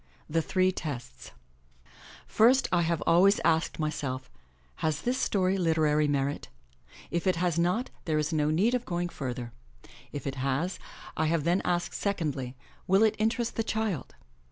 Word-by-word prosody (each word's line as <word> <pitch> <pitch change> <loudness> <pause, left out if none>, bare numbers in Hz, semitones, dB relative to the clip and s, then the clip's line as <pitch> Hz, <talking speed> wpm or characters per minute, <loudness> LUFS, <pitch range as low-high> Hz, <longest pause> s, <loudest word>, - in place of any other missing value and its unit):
THE 165 +2 +1
THREE 185 +3 +2
TESTS 130 - -6 1.0
|IRST 250 +5 +4
I 175 -1 +3
have 165 -2 0
always 195 +4 +5
asked 160 0 +2
myself, 135 -4 -3 0.5
"Has 155 -2 -1
this 250 +2 0
story 190 -4 +1
literary 155 -3 +2
merit?" 140 0 -1 0.6
If 170 +2 -1
it 185 - +3
has 170 -1 0
not, 180 +9 0
there 155 -2 +1
is 155 +2 -1
no 150 -1 +2
need 195 +10 +2
of 250 -1 0
going 175 -3 -2
further. 125 -5 -5 0.6
If 145 - -6
it 135 -1 -3
has, 140 +7 -1 0.4
I 155 - +1
have 160 -1 +1
then 175 +4 +2
asked 175 0 -1
secondly, 145 -10 -2 0.3
'*Will 195 +3 +5
it 220 -1 +4
interest 225 +2 0
the 225 - +1
child?" 220 - -2
170 Hz, 155 wpm, -28 LUFS, 150-190 Hz, 1.0 s, always